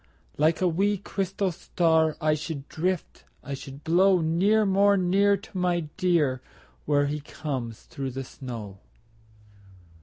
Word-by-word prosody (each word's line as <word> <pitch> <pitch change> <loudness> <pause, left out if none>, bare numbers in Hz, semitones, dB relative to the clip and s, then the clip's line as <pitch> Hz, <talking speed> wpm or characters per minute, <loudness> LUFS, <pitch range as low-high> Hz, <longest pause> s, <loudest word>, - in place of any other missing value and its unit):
Like 155 +4 +2
a 185 - +4
wee, 200 +5 +1
crystal 195 0 -2
star 160 -2 +1
I 155 0 +2
should 150 -2 -5
drift, 180 +2 -3 0.2
I 140 - -6
should 135 +1 -8
blow 180 +3 +4
Near, 190 +7 +3
more 200 +1 +4
near, 195 +2 +3
To 200 +1 -16
my 180 -1 +1
dear 155 -8 +1 0.5
Where 145 -1 +3
he 150 +1 -2
comes 130 -6 -5
through 135 -1 -5
the 135 +1 -5
snow. 115 -7 -8
165 Hz, 140 wpm, -26 LUFS, 140-190 Hz, 0.5 s, a